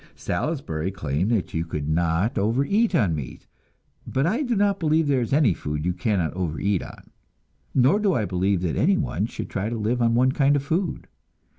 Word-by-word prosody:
Salisbury 90 - -2
claimed 85 0 -2
that 110 -6 -1
you 80 - -1
could 75 -3 -4
not 85 - +1
overeat 140 - +1
on 100 - +2
meat, 75 -5 -6 0.6
but 135 +2 0
I 220 - +1
do 245 -5 0
not 200 -1 +2
believe 160 -1 +2
there 135 -3 +2
is 115 - -3
any 135 - +4
food 75 -1 -4
you 90 - +1
cannot 90 -3 -1
overeat 90 +2 -1
on, - - -12 0.6
nor 135 +10 +4
do 200 -5 +2
I 110 - 0
believe 95 0 0
that 85 - -1
anyone 155 - +1
should 110 -4 -6
try 100 +2 -2
to 120 - -3
live 115 +3 -1
on 115 0 +3
one 130 +2 +4
kind 140 +1 +3
of 140 - 0
food. 165 +3 -2
110 Hz, 190 wpm, -24 LUFS, 90-145 Hz, 0.6 s, any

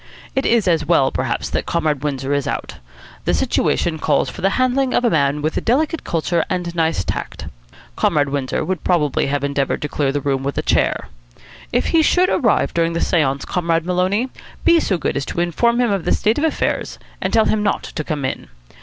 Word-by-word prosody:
It 270 - +1
is 230 -4 +2
as 165 -3 +2
well, 145 -4 +3
perhaps, - - -2
that - - -2
Comrade 155 -5 0
Windsor 140 -1 -2
is 140 -1 0
out. - - -4 0.5
The - - +2
situation 160 -2 0
calls 130 - +1
for - - -9
the 195 - +3
handling 255 +1 +1
of 245 - +2
a 235 - +3
man 145 -1 +1
of 155 - -1
delicate 310 +7 +1
culture 165 0 0
and 180 -2 -2
nice 160 - 0
tact. - - -5 0.5
Comrade 145 -2 +1
Windsor 135 -2 -2
would 185 -3 -3
probably 150 -7 +1
have 140 0 -1
endeavoured 140 -1 0
to - - -1
clear 140 -2 0
the 145 - -1
room 135 -1 -1
with 140 +1 -3
a - - 0
chair. - - +1 0.6
If - - +1
he 330 - +4
should 360 +4 +3
arrive 230 -5 +2
during 165 0 +1
the 170 - -1
seance, 140 -7 +1
Comrade 165 -2 0
Maloney, 185 +7 0 0.4
be 335 - +6
so 195 - 0
good 165 - -2
as 140 - -1
to - - -4
inform 235 +8 +1
him 240 -3 +2
of 195 -4 -1
the - - +2
state 220 +6 +1
of - - -1
affairs, 320 - -1 0.2
and - - -1
tell 220 - +4
him 215 - +1
not 205 -1 0
to 155 - -5
come 150 -3 -3
in. - - -4
170 Hz, 210 wpm, -19 LUFS, 145-215 Hz, 0.6 s, be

